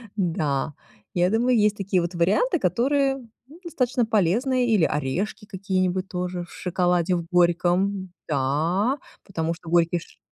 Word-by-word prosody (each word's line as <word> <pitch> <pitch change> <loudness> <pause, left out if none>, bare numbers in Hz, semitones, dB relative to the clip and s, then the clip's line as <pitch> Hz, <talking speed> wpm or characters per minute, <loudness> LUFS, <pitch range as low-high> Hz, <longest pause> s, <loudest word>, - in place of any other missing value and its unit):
Да, 155 -6 -1 0.4
я 180 +1 +2
думаю, 240 +3 +2
есть 210 0 +3
такие 190 -2 0
вот 175 +2 -3
варианты, 210 - +2
которые, 270 - +1 0.3
ну, 315 +5 -15
достаточно 255 -7 0
полезные, 235 +6 +1
или 210 -6 +3
орешки 160 - -2
какие-нибудь 190 -2 -1
тоже 180 -1 -3
в - - -19
шоколаде 180 0 +1
в 170 - -3
горьком. 180 +2 +2 0.2
Да, 160 - +1 0.3
потому 165 -4 -2
что 170 -1 -11
горький 170 0 +3
ш - - -16
185 Hz, 140 wpm, -24 LUFS, 170-220 Hz, 0.4 s, есть